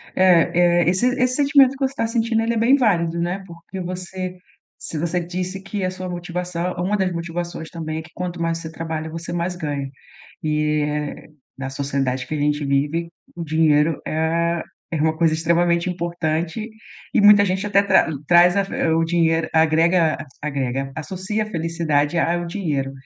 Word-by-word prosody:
É 175 -1 +4
é. - - +2
Esse 185 +7 +2
esse 255 0 +2
sentimento 280 -2 +5
que 275 - -9
você 265 - -2
está 230 -4 -2
sentindo 225 0 +1
ele 230 +1 0
é - - -1
bem 235 +5 +5
válido, 170 -10 +1
né, 180 +3 -2
porque 170 +2 -10
você 185 +1 -5 0.4
se 160 - -6
você 170 +3 -1
disse 180 +2 -4
que 195 +1 -4
a 185 - +1
sua 185 0 -6
motivação 175 0 -3
uma 185 +4 0
das 190 -2 0
motivações 170 -1 -5
também 160 -2 -5
é - - -5
que 165 +1 -15
quanto 180 -1 -5
mais 165 0 0
você 160 -1 -7
trabalha, 160 -1 -4
você 165 +1 -6
mais 175 +1 -2
ganha 145 -5 -3 0.5
e 150 0 +1
eh, 150 0 -4 0.3
na 135 0 -4
sociedade 135 -1 -2
que 155 - -3
a - - -2
gente 150 0 0
vive, 145 +5 0 0.3
o 170 - -5
dinheiro 155 0 +2
é 165 +2 0 0.3
é 160 -3 -1
uma 160 0 +1
coisa 165 -1 +3
extremamente 170 +2 +1
importante, 170 +3 -2 0.5
e - - +5
muita 205 0 +7
gente 190 +1 -1
até 200 -1 +4
tra 200 - +4 0.2
traz 175 +1 +6
a 200 - +3
fe - - -7 0.2
o 165 - +2
dinheiro 165 -1 +1
agrega 160 +1 +3 0.2
agrega 135 -2 -2
associa 190 +6 -3
a - - -6
felicidade 165 -4 0
a 170 +1 +2
ao 175 0 -3
dinheiro. 155 -7 -2
170 Hz, 180 wpm, -21 LUFS, 160-185 Hz, 0.5 s, muita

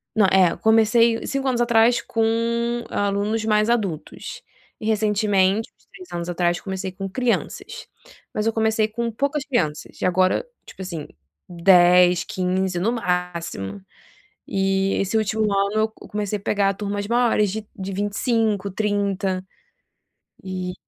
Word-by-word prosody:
Não, 205 -3 +5
é, 185 -3 +4
comecei 225 +1 +3
5 275 -1 -2
anos 245 -2 +1
atrás 235 0 +4
com 225 -1 -1 0.7
alunos 205 +2 -1
mais 215 0 +2
adultos 200 -10 -3 0.4
e 215 - -7
recentemente, 210 -1 +2
uns - - -32
3 365 -1 -13
anos 170 0 -4
atrás, 175 0 0
comecei 190 -1 -4
com 195 +1 -6
crianças, 245 +3 -2 0.5
mas 215 - -1
eu 225 - +1
comecei 220 -1 +1
com 230 +1 -3
poucas 280 +4 -1
crianças, 165 - -2
e - - 0
agora, 185 - +2 0.2
tipo, - - -12
assim, 165 -5 -6 0.4
10, 180 0 +5
15, 185 -1 -1
no 220 +6 +1
máximo, 175 - -3 0.7
e 195 0 +1
esse 195 +3 -1
último 220 0 0
ano 200 0 +1
eu - - +2
comecei 210 -1 -4
a - - -14
pegar 200 -1 +1
turmas 205 0 -4
maiores 235 -3 +2
de 220 0 -5
de 195 -1 -5
25, 205 0 0
30, 200 -2 -1 1.0
e 185 -1 -4
200 Hz, 140 wpm, -22 LUFS, 185-220 Hz, 1.0 s, Não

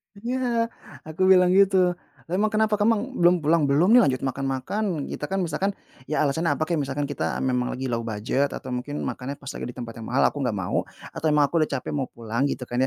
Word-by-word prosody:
Iya, 235 +1 -1 0.4
aku 155 +4 -6
bilang 180 -1 +6
gitu. 195 0 +5 0.6
"Emang 205 +4 +2
kenapa, 215 0 +1
kemang 215 0 +3
kamu 260 - -7
belum 175 +1 +6
pulang?" 160 +2 +3
"Belum 160 +9 +3
nih 245 - +8
lanjut 130 -2 -1
makan-makan," 135 +7 -2
kita 150 - -4
kan 195 -1 -1
misalkan, 180 +5 -1 0.4
ya 150 +1 +1
alasannya 150 +1 +1
apa 155 - -1
kek, 165 0 -1
misalkan 140 +1 -2
kita 145 0 -2
memang 125 -1 0
lagi 130 -1 -3
low 115 - 0
budget 115 +5 -1
atau 130 - -7
mungkin 130 +4 -4
makannya 135 +3 -4
pas 140 -1 -8
lagi - - -6
di 125 - -8
tempat 120 -2 -6
yang 110 - -7
mahal, 130 - +2
aku 145 - -7
nggak 125 -6 -1
mau 95 -2 -2 0.2
atau - - -6
emang 150 -1 +4
aku 165 - +2
udah 155 - +1
capek 130 - -4
mau 140 -3 -2
pulang 115 +4 -2
gitu 135 - -3
kan 120 0 -3
145 Hz, 225 wpm, -25 LUFS, 130-190 Hz, 0.6 s, nih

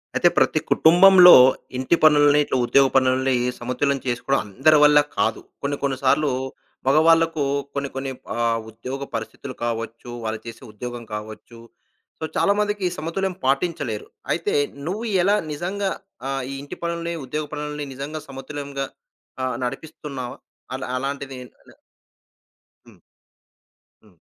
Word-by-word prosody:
అయితే - - +4
ప్రతి - - +3
కుటుంబంలో 180 +2 +8 0.4
ఇంటి 130 +6 +2
పనులని, 145 -1 +6
ఇట్లా 130 - -1
ఉద్యోగ 135 +2 +5
పనులని 130 0 +3 0.3
సమతుల్యం 135 +3 -1
చేసుకోవడం 125 +3 0
అందరి 140 +10 +4
వల్ల 150 0 +7 0.2
కాదు. - - 0 0.2
కొన్ని 140 0 -2
కొన్ని 135 -2 0
సార్లు 140 +3 +3 0.6
మగవాళ్ళకు 165 +1 +4 0.3
కొన్ని 140 -1 -3
కొన్ని 135 0 -3 0.2
ఆహ్, 115 -1 +1
ఉద్యోగ 130 +5 -6
పరిస్థితులు 115 +3 -6
కావచ్చు, 115 +1 -4 0.2
వాళ్ళు 110 0 -3
చేసే 115 +2 -9
ఉద్యోగం 120 +2 -7
కావచ్చు 110 +2 -8 0.6
సో, - - -3
చాలామందికి 205 0 +1
ఈ - - 0
సమతుల్యం 185 +4 -2
పాటించలేరు. 135 -5 -1 0.3
అయితే - - -2 0.3
నువ్వు 210 +6 -3 0.2
ఎలా 200 +3 +4 0.2
నిజంగా 190 +6 -2 0.4
ఆహ్, 135 -1 -2
ఈ - - -5
ఇంటి 145 - -8
పనులని, 170 0 -3
ఉద్యోగ 150 +4 -3
పనులని 150 0 -4
నిజంగా 140 +4 -6
సమతుల్యంగా? 140 0 -6 0.6
ఆహ్, 130 -1 -1
నడిపిస్తున్నావా? 135 -1 -6 0.4
అలా 130 0 -4
అలాంటిదేవైనా 135 -2 -7 1.1
హ్మ్. - - -18 1.0
హ్మ్. 100 -5 -24
140 Hz, 125 wpm, -22 LUFS, 125-155 Hz, 1.1 s, కుటుంబంలో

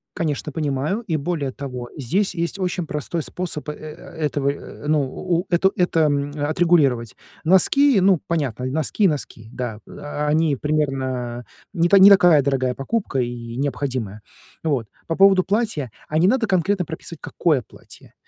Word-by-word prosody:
Конечно, 155 -2 -2
понимаю, 150 - -1
и 165 - 0
более 150 -2 -2
того, 125 -3 -6
здесь 180 - 0
есть 170 +3 -2
очень 180 -2 -2
простой 150 +2 -3
способ, 165 -4 -4
э, - - -3
э, 155 0 -9 0.3
этого, 145 -1 0
э, 145 +1 -7
ну, 155 -1 +3
у 175 +6 -2
это 185 +2 +3
это, 175 -2 +2
м, 145 -1 +1
отрегулировать. 145 -6 +2 0.3
Носки, 210 - +5
ну, 190 -2 +4
понятно, 140 -7 -2
носки 155 +9 0
и - - +7
носки, 125 -8 -4
да, 120 -4 -4
о 145 0 -5
они 155 -1 +2
примерно 130 -5 -2 0.3
не 170 -2 +2
та 200 - +6
не 195 +1 +9
такая 175 -6 +6
дорогая 130 -2 0
покупка 135 - -2
и 120 -1 -4
необходимая. 130 -6 -3 0.4
Вот, 135 -9 -1 0.2
по 165 - -1
поводу 195 -1 +5
платья, 200 - -1 0.2
а 155 - 0
не 175 - +4
надо 235 +2 +2
конкретно 190 +1 +1
прописывать, 160 0 -9
какое 155 -7 0
платье. - - -17
150 Hz, 160 wpm, -22 LUFS, 135-175 Hz, 0.4 s, не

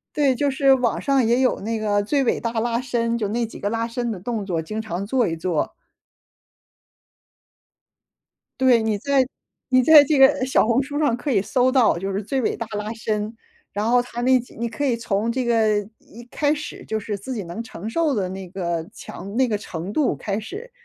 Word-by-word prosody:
对， 280 -3 +3
就 285 +3 +1
是 270 0 +4
网 250 -3 0
上 275 -3 +2
也 240 +3 +3
有 260 - +2
那 225 +2 -2
个 205 -1 +1
最 275 +7 +1
伟 - - +1
大 230 - -3
拉 235 0 0
伸， 235 -2 -1
就 215 -3 -2
那 230 +3 -1
几 225 - -11
个 205 - -2
拉 230 +1 -1
伸 240 0 -3
的 200 -5 -5
动 220 +1 -3
作， 175 -4 -1
经 215 +7 -5
常 195 -2 -4
做 245 +1 +2
一 165 - -1
做。 165 -1 -2 2.9
对， 250 -3 +5
你 220 -2 0
在 275 +3 +2 0.4
你 255 -1 +4
在 300 +2 +8
这 290 0 +1
个 270 -1 +5
小 265 - +3
红 235 +4 +2
书 285 +2 -4
上 290 -6 +2
可 280 +4 -4
以 205 - +3
搜 255 +5 +1
到 250 -9 +4
就 195 +2 -3
是 195 +2 -2
最 265 +6 -1
伟 - - 0
大 230 - -5
拉 210 +1 -3
伸， 215 -1 -3 0.4
然 210 +2 -1
后 245 0 +4
它 240 -1 -7
那 260 +1 +5
几 245 - -15
你 235 +1 -2
可 260 +6 -4
以 255 -4 +2
从 230 0 -1
这 255 +1 -1
个 220 -3 +3 0.2
一 235 +2 -14
开 295 0 +1
始 300 0 -7
就 220 0 -2
是 210 0 -4
自 230 +7 -6
己 215 - -3
能 175 +7 -6
承 220 -4 -8
受 310 +4 +1
的 195 -5 -1
那 190 0 -7
个 170 -3 -3
强 200 +2 -9
那 260 0 +3
个 215 - 0
程 180 -1 -6
度 290 +3 +1
开 200 -1 -3
始。 410 - -8
230 Hz, 235 characters per minute, -22 LUFS, 205-260 Hz, 2.9 s, 在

